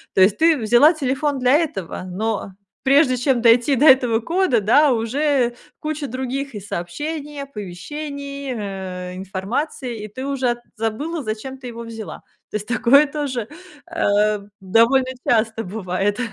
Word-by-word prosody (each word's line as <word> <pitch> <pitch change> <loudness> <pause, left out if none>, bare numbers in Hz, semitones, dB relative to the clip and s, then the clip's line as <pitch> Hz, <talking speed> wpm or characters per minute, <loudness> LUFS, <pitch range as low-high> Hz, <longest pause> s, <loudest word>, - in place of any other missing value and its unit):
То - - +4
есть 195 +2 +5
ты 330 0 +5
взяла 240 +7 +5
телефон 275 -1 -1
для 250 +1 +3
этого, 200 - -3
но 195 +2 -3 0.3
прежде 270 -1 +4
чем 245 -1 +1
дойти 240 +4 +5
до 285 +5 +3
этого 250 -4 +5
кода, 305 - +1
да, 280 +8 +5
уже 245 +2 +1 0.2
куча 305 -1 -3
других 265 +2 -4
и - - -4
сообщения, 290 - -5
оповещений, 280 +5 -6
э 190 -4 -5
информации, 210 - -4
и - - -5
ты 260 +6 -6
уже 265 -3 0
от 240 - -4 0.2
забыла, 275 +9 -3
зачем 220 +5 -5
ты 260 - -12
его 235 -1 -7
взяла. 225 -2 -8 0.3
То - - +1
есть 210 - -9
такое 250 +4 +5
тоже, 275 -6 -3 0.4
э 210 -8 +2 0.2
довольно 235 +7 +3 0.2
часто 225 -1 +2
бывает. 195 +1 -2
245 Hz, 145 wpm, -21 LUFS, 215-280 Hz, 0.4 s, есть